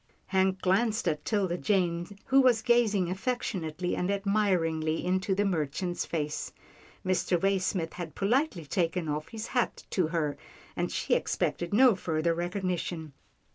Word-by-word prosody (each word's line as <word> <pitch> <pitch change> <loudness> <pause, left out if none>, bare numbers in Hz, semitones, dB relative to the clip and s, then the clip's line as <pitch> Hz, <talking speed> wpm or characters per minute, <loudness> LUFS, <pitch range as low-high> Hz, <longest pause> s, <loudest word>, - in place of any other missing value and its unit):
Hank 190 -1 +1
glanced 210 +2 +2
at 155 -3 0
'Tilda 190 -5 0
Jane 180 -1 0
who 270 +1 +5
was 245 -4 +4
gazing 215 -7 +3
affectionately 185 -5 -2
and 180 - -1
admiringly 185 -6 +1
into 185 +1 +1
the 205 +1 +1
merchant's 175 0 -1
face. 150 -2 -3 0.5
Mr. 185 -1 +1
Waysmith 185 -3 0
had 175 -3 -7
politely 210 - +1
taken 170 +2 -1
off 150 +1 -2
his 220 -1 -6
hat 245 -3 -1
to 180 -5 +2
her, 155 -3 -1 0.4
and - - -1
she - - 0
expected 175 -1 0
no 245 +3 +6
further 165 -2 0
recognition. 175 -3 -3
185 Hz, 135 wpm, -29 LUFS, 165-205 Hz, 0.5 s, no